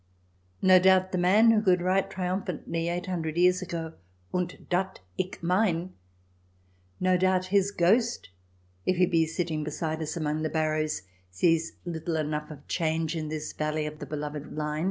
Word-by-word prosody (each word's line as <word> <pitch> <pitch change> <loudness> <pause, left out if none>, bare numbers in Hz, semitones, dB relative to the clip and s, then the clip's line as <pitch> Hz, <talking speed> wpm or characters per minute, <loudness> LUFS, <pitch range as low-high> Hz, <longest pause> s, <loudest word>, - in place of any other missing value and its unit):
No 185 0 +7
doubt 185 0 +4
the 185 - 0
man 205 +6 +5
who 220 -2 +3
could 185 -3 +3
write 185 +2 +1
triumphantly 180 -2 -2
eight 175 +1 -2
hundred 165 -3 -3
years 180 +1 +4
ago, 165 -3 -5 0.2
" 90 0 -36
Und 180 -1 -3
dat 185 +1 -1 0.2
ick 185 -1 -3
mein" 180 -1 +1 0.5
— 90 0 -37
no 185 - +5
doubt 185 0 +2
his 200 -1 +4
ghost, 215 - +2 0.5
if 185 - +1
it 180 - +3
be 165 -1 +3
sitting 160 -2 -2
beside 155 +1 -3
us 155 +2 -3
amongst 155 -1 -1
the 155 - -1
barrows, 155 - 0 0.3
sees 165 - +1
little 165 -1 -3
enough 150 -1 -2
of 150 -2 -11
change 160 -1 0
in 155 -2 -3
his 155 0 -4
valley 155 0 -1
of 150 0 -6
the 145 - -7
beloved 150 0 -5
Lein. 150 0 -2
165 Hz, 175 wpm, -28 LUFS, 155-185 Hz, 0.5 s, No